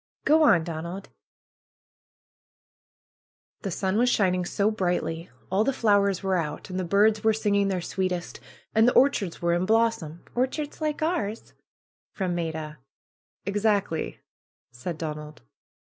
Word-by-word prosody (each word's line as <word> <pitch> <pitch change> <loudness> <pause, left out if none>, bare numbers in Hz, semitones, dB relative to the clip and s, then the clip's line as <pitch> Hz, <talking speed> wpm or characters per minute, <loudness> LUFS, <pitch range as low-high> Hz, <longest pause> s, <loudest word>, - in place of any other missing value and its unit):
Go 315 +2 +5
on, 175 - +5
Donald 170 +4 -6
P' - - -35 2.6
^^The - - -5
sun 190 +3 -1
was 245 +1 +4
shining 185 -5 +2
so 200 +4 +1
brightly, 175 -4 -2 0.2
all 195 +3 +3
the 275 - +2
flowers 200 -6 +2
were 190 -1 +1
out, 160 +2 -4
and 185 - -2
the - - -1
birds 210 +4 +3
were 220 0 +4
singing 200 -2 +1
their 185 -2 -1
sweetest. 180 -1 -3 0.3
And 220 +2 +5
the 245 - +4
orchards 210 -12 +2
were 170 0 +3
in 175 +2 0
blossom 225 -8 +1
^'Orchards 285 +5 -2
like 305 0 -1
ours?" 310 - -2 0.6
from 185 -3 -1
Maida. 160 -3 -4 0.7
'^Exactly!" 200 -4 0 0.5
said 125 +8 -6
Donald. 150 - -6
195 Hz, 135 wpm, -26 LUFS, 170-220 Hz, 2.6 s, Go